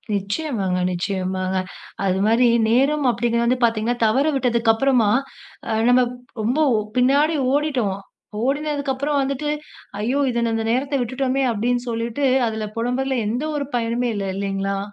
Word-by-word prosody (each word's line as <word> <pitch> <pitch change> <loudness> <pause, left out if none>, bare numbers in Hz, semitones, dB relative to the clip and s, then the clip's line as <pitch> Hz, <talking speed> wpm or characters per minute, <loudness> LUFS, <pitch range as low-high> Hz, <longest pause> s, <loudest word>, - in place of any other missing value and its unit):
நிச்சயமாங்க. 200 -2 -2
நிச்சயமாங்க. 185 +1 -2 0.5
அது 190 0 +1
மாதிரி 230 +3 +4 0.2
நேரம் 275 +5 +2
அப்படிங்கறது 235 +2 +1
பாத்தீங்கன்னா, 230 +1 +1
தவறிவிட்டதக்கு 250 -2 +2
அப்புறமா, 240 -2 +2 0.6
அ - - 0 0.2
நம்ம 250 +1 +5 0.4
ரொம்ப 240 +8 0 0.4
பின்னாடி 285 +5 +3 0.2
ஓடிட்டோம். 265 -10 0 0.5
ஓடினதுக்கு 285 0 -1
அப்புறம் 285 +2 -1
வந்துட்டு, 275 +2 -2 0.5
"ஐயோ! 245 +7 0
இது 235 0 -1
அந்த 225 0 -2
நேரத்தை 275 +3 0
விட்டுட்டோமே!" 260 +2 -1
அப்படின்னு 240 +3 0
சொல்லிட்டு 235 +4 -2 0.2
அதுல 220 -1 -3
புலம்பறதுல 255 +3 -1
எந்த 240 +6 -2
ஒரு 285 -1 -2
பயனுமே 240 +1 0
இல்ல 200 -1 -2
இல்லைங்களா? 195 0 -2
240 Hz, 125 wpm, -21 LUFS, 220-275 Hz, 0.6 s, நம்ம